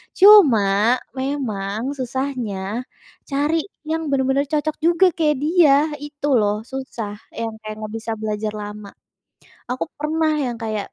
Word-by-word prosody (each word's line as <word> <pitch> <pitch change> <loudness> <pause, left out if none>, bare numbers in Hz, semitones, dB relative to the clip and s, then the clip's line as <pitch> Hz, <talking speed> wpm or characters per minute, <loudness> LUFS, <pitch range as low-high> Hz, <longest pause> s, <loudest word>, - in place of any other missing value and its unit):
cuma 240 - +6 0.2
memang 255 -4 -3
susahnya 250 -5 -3 0.4
cari 300 +5 0 0.2
yang 320 0 -2
bener-bener 275 0 +1
cocok 305 +1 -1
juga 345 +3 +4
kayak 300 -4 +1
dia, 315 -3 +5 0.2
itu 290 0 -5
loh 210 +1 0
susah 235 -5 -6 0.2
yang 230 -1 -3
kayak 215 -1 -7
nggak 215 - -5
bisa 225 0 -4
belajar 215 0 -3
lama, 210 -1 -8 0.7
aku 255 +5 -3
pernah 310 +1 0
yang 245 -5 -2
kayak 215 -2 -4
260 Hz, 125 wpm, -21 LUFS, 215-300 Hz, 0.7 s, cuma